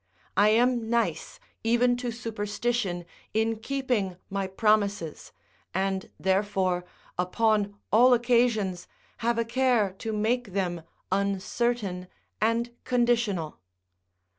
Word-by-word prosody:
I 205 +1 +5
am 235 0 +2
nice, 235 0 -1 0.2
even 240 +2 +3
to 245 0 -3
superstition, 220 -4 -2 0.3
in 220 0 +1
keeping 240 -7 -1
my 195 -1 -1
promises, 200 -4 0 0.4
and, 190 0 -1
therefore, 190 -2 +1 0.3
upon 205 +2 +1 0.2
all 245 +4 +6
occasions 235 -6 +1 0.3
have 235 0 0
a 230 - +1
care 235 -5 +2
to 225 - -3
make 220 0 0
them 180 -3 -1 0.3
uncertain 200 0 -1 0.3
and 230 +2 +1
conditional. 235 -9 +1
215 Hz, 100 wpm, -27 LUFS, 195-240 Hz, 0.4 s, all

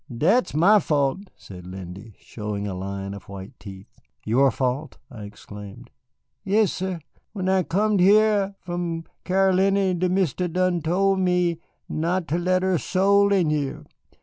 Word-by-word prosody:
Dat's 170 - +1
my 195 +7 +5
fault," 155 +4 -1
said 90 -2 -12
Lindy, 95 +3 -9
showing 105 -2 -6
a 100 - -4
line 100 +1 -5
of 100 -1 -11
white 100 0 -9
teeth. 95 -1 -12 0.3
"Your 130 +5 +3
fault," 130 +3 -2
I 110 -5 -8
exclaimed. 105 -1 -11 0.5
"Yassir. 190 -3 0 0.3
When 190 -3 -3
I 190 0 +3
comed 205 +4 +1
here 200 +1 +4
from 175 -2 -4 0.2
Caroliny 190 0 +2
de 185 +1 +1
Mistis 180 -2 0
done 180 -1 +1
tole 190 +5 +1
me 180 -2 +1 0.3
not 170 +2 -1
ter 170 - -1
let 185 +1 +1
er 190 -3 +1
soul 200 +3 +3
in 180 -6 +2
hyah. 145 -3 -2
175 Hz, 145 wpm, -24 LUFS, 115-190 Hz, 0.5 s, my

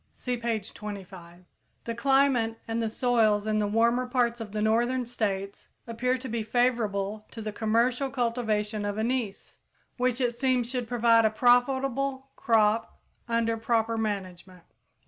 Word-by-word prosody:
(See 250 -1 -3
page 230 -4 -3
25.) 185 -4 -9 0.4
The 230 - -4
climate 255 -2 +2
and 230 0 -1
the 225 - -1
soils 220 -3 +2
in 215 0 +1
the 210 - +1
warmer 235 +4 +2
parts 240 -2 0
of 215 -3 -7
the 215 - -3
northern 240 +4 +1
states 200 -4 -3 0.2
appear 250 +2 -1
to 260 +1 -7
be 230 -1 -2
favorable 215 -3 0
to 230 - -10
the 215 -1 -4
commercial 235 +5 +1
cultivation 225 -4 -1
of 205 0 -3
anise, 225 -2 -3 0.4
which 250 0 0
it 245 -2 +1
seems 250 -1 0
should 250 -3 -3
prove 240 -1 -4
a 230 -1 +6
profitable 265 +3 +1
crop 220 -1 +1 0.3
under 230 -1 +1
proper 225 0 0
management. 185 -4 -4
230 Hz, 145 wpm, -27 LUFS, 215-245 Hz, 0.4 s, a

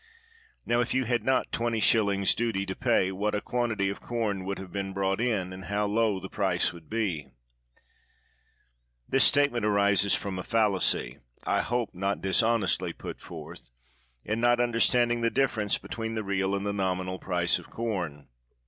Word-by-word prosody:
Now, 120 0 +2
if 120 +1 0
you 130 -1 +1
had 120 -2 0
not 130 +2 +1
20s. 110 -4 +2
duty 115 -5 -1
to 95 -1 -4
pay, 115 -7 +2
what 105 +3 -1
a - - +1
quantity 115 -4 -1
of 100 - -6
corn 110 -5 -2
you - - -7
would 100 +1 -3
have 95 -2 -9 0.2
brought 95 +2 0
in, 100 -7 -1
and 95 0 -9
how 105 +1 0
low 105 -1 +1
the 95 - -7
price 95 -4 0
would 85 -3 -14
be! 100 -10 -2 0.9
" - - -40
This 135 - +5
statement 145 -5 +4
arises 100 -1 +4
from 95 -2 -4
a - - -4
fallacy 100 - +1
— - - -36
I - - +2
hope 120 -1 -2
not 95 +2 -1
dishonestly 95 -4 +1
put - - -8
forth - - -10 0.3
— - - -36
in 110 +2 -1
not 120 0 +4
understanding 120 0 +2
the 115 - +2
difference 115 -6 +1
between 115 0 -5
the 110 - -2
real 100 0 0
and 100 0 -3
the 100 - -1
nominal 95 -1 -2
price 90 -2 0
of - - -14
corn. 90 -11 -4
100 Hz, 175 wpm, -28 LUFS, 95-115 Hz, 0.9 s, This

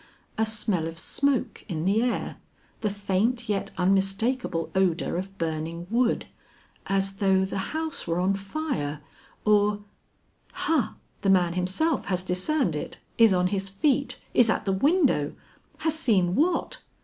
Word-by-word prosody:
A 220 0 +1
smell 210 -6 +2
of 165 0 -7
smoke 275 +8 0
in 160 -2 -2
the 200 +4 +3
air, 245 0 -1 0.4
the 215 - 0
faint 205 +4 -1
yet 205 -2 -1
unmistakable 195 +1 0
odor 185 -4 +1
of 190 +2 -5
burning 165 +1 -3
wood, 240 0 +2 0.6
as 195 0 0
though 190 -1 +3
the 190 - -3
house 315 0 -2
were 165 +1 0
on 185 +2 +2
fire, 195 - -3 0.4
or 210 -1 +3 0.7
Ha! 305 -8 0 0.3
the 195 - +1
man 180 -3 +4
himself 185 - 0
has 185 -2 -1
discerned 185 - 0
it, 150 - -5 0.2
is 225 -2 +7
on 180 -1 +2
his 195 0 -1
feet, 275 +8 0
is 235 -2 +5
at - - 0
the 195 - +1
window, 270 - +2 0.4
has 315 0 +1
seen 190 - +2
what? 335 - +1
195 Hz, 145 wpm, -26 LUFS, 180-240 Hz, 0.7 s, is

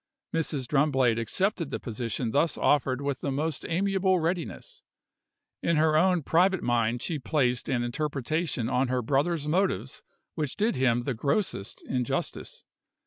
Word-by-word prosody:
Mrs. 155 -5 -1
Drumblade 135 -4 +2
accepted 175 - 0
the - - -3
position 115 0 -3
thus 150 +5 +1
offered 135 -2 +2
with 140 -2 -2
the - - -2
most 150 +2 -2
amiable 190 +1 +2
readiness. 180 - -3 0.8
In 170 - +1
her 155 0 +3
own 180 0 +3
private 185 +5 +3
mind 120 0 +1
she 160 -3 -2
placed 125 -4 0
an 125 -3 +1
interpretation 145 +1 -2
on 130 +2 +1
her 125 0 -1
brother's 145 +5 0
motives 150 - 0 0.3
which 150 -5 -3
did 220 +3 +1
him 120 -2 +2
the 130 +2 -2
grossest 140 - -2
injustice. 125 -2 -3
145 Hz, 140 wpm, -27 LUFS, 125-170 Hz, 0.8 s, her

